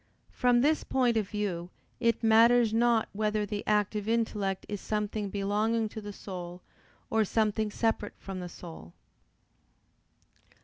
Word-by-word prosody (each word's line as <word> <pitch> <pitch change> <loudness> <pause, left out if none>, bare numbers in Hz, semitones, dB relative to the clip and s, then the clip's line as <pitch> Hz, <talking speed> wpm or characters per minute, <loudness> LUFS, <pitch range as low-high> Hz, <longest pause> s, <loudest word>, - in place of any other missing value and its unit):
From 245 -1 +3
this 305 +3 +2
point 250 -3 +1
of 210 -3 0
view 190 -5 -3 0.3
it 230 0 +1
matters 225 +1 +5
not 235 0 +3
whether 210 0 0
the 205 0 -4
active 210 0 +1
intellect 210 -4 -1
is 205 -2 -5
something 210 -1 -2
belonging 210 +3 0
to 220 - -7
the 205 0 -7
soul, 180 -3 -8 0.5
or 220 0 +3
something 215 0 0
separate 215 -1 -1
from 195 -1 -7
the 180 -1 -6
soul. 160 - -11
210 Hz, 135 wpm, -29 LUFS, 200-225 Hz, 0.5 s, matters